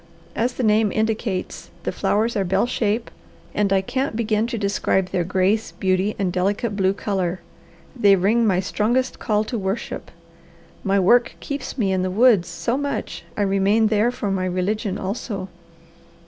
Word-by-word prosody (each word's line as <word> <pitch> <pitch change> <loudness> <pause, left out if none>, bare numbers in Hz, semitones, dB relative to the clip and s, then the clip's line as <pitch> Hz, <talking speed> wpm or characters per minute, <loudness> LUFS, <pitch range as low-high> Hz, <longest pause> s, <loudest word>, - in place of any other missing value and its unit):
As 245 +2 0
the 255 - -3
name 215 -1 +3
indicates, 220 -3 -2
the - - -1
flowers 225 +3 0
are 200 - +1
bell 190 +4 +1
shape 230 -2 -1 0.4
and 205 -1 +1
I 195 -1 +4
can't 260 +4 -2
begin 220 -1 +1
to 235 - -3
describe 200 -2 0
their 175 - +1
grace, 190 +5 0
beauty, 190 +2 0
and 185 -3 -1
delicate 200 +4 0
blue 190 -1 +2
colour. 190 -3 -2 0.6
They 205 -5 +5
ring 215 +5 +2
my 185 -2 +2
strongest 240 +7 0
call 210 -2 +1
to 230 +1 -4
worship. 195 +3 -4 0.7
My 195 0 +2
work 235 +6 +4
keeps 280 -1 -5
me 200 -6 +1
in 190 -1 +1
the 185 - -1
woods 210 -2 +4
so 205 +9 -2
much 285 0 -4
I 205 - +2
remain 200 +3 +3
there 215 +2 +3
for 210 -5 -3
my 185 -1 0
religion 190 +2 -1
also. 200 -1 -4
205 Hz, 165 wpm, -22 LUFS, 190-225 Hz, 0.7 s, They